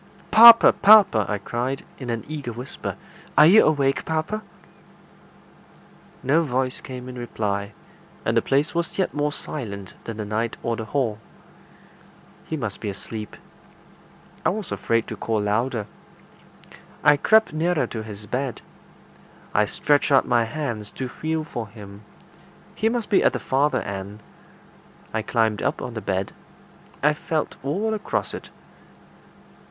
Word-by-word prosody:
"Papa! 230 +1 +10
papa!" 200 - +6
I 105 - 0
cried, 120 +6 -3
in 130 -3 -6
an 115 -1 -2
eager 145 -5 -5
whisper. 125 +3 -6 0.4
"Are 150 - +9
you 195 +7 +7
awake, 140 -3 +2
papa?" 160 +7 -2 1.8
No 145 +6 +3
voice 130 -4 -1
came 125 -1 -8
in 125 -1 -8
reply, 100 -3 -3 0.5
and - - +1
the - - +4
place 140 +3 +1
was 170 -1 -2
yet 190 - 0
more 150 0 0
silent 100 -11 -6
than 115 -2 -6
the 105 - -4
night 110 +2 -2
or 115 - -1
the 110 - -5
hall. 115 -4 -1 1.3
He 160 - -3
must 110 -8 -5
be 105 - -3
asleep. 105 +2 -7 1.1
I - - +3
was 205 -1 -3
afraid 115 0 0
to - - -6
call 110 -1 -1
louder. 110 +2 -1 1.2
I 145 - +7
crept 220 +6 +3
nearer 165 +1 +1
to 110 - -6
the 105 -1 -9
bed. 130 0 -3 0.9
I 105 - +3
stretched 145 +4 +1
out 135 - +5
my 120 -2 +3
hands 115 -5 -4
to 130 -1 -5
feel 160 +4 -3
for 120 -7 -6
him. 100 -2 -12 0.7
He 220 - +1
must 235 -2 -3
be 200 - +5
at - - +3
the - - -2
farther 140 +3 +1
side. 100 +1 -6 0.9
I 110 - 0
climbed 110 -1 0
up - - -1
on 125 - -6
the 110 - -5
bed. 95 -1 -2 0.7
I 150 +1 +5
felt 155 0 -3
all 195 +11 -1
across 215 - -2
it. - - -8
125 Hz, 145 wpm, -23 LUFS, 110-155 Hz, 1.8 s, Papa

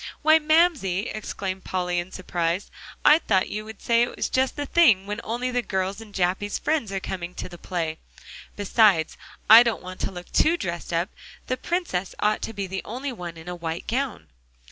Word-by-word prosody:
"Why, 315 +1 +6
Mamsie!" 300 - +2
exclaimed 195 -3 -5
Polly 180 -1 -1
in 175 +2 -6
surprise, 175 0 -2 0.3
"I 305 - +8
thought 190 - +1
you'd 215 0 -7
say 235 0 +3
it 240 - 0
was - - -1
just 260 0 +1
the 290 - -3
thing 235 - +4
when 210 +3 -4
only 245 +3 -2
the 245 0 +1
girls 190 -1 -2
and 220 -2 -12
Jappy's 190 +2 0
friends 300 -10 -1
are 195 - -2
coming 180 -2 -5
to - - -5
the 175 -1 -12
play. 165 -3 -3 0.6
Besides, 200 -5 +3 0.3
I 225 +2 +11
don't 235 -2 0
want 185 0 -8
to - - -2
look 175 -1 -10
too 335 +2 +3
dressed 175 - -4
up; 170 +3 0 0.4
the 255 - -1
Princess 255 - -2
ought 210 0 +1
to - - -4
be 200 -2 -4
the 190 0 -4
only 260 +5 -5
one 175 -7 -7
in 165 +1 -12
a 180 - -4
white 165 -1 -5
gown." 260 0 -3
200 Hz, 195 wpm, -25 LUFS, 180-245 Hz, 0.6 s, I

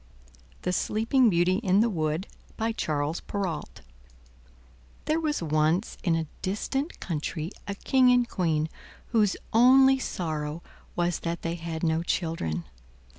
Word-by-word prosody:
THE 180 - 0
SLEEPING 225 +6 +2
BEAUTY 180 0 +3
IN 200 -2 +3
THE 235 - +3
WOOD 155 0 -1 0.3
By 225 +1 0
Charles 155 -6 -1
Perrault 185 - -4 1.2
There 310 +2 +1
was 300 - -1
once 155 +5 +1
in 170 -5 +2
a 165 0 -1 0.2
distant 270 - -2
country 160 0 -3 0.2
a 200 - -3
King 255 +4 +3
and 245 -1 +4
Queen 160 -7 0 0.4
whose 215 -4 +2 0.2
only 265 +3 +6
sorrow 155 -7 -3 0.3
was 175 -1 0
that 170 0 -4
they 165 - -1
had 165 -1 -5
no 160 0 +2
children. 160 - -2
175 Hz, 130 wpm, -27 LUFS, 160-225 Hz, 1.2 s, only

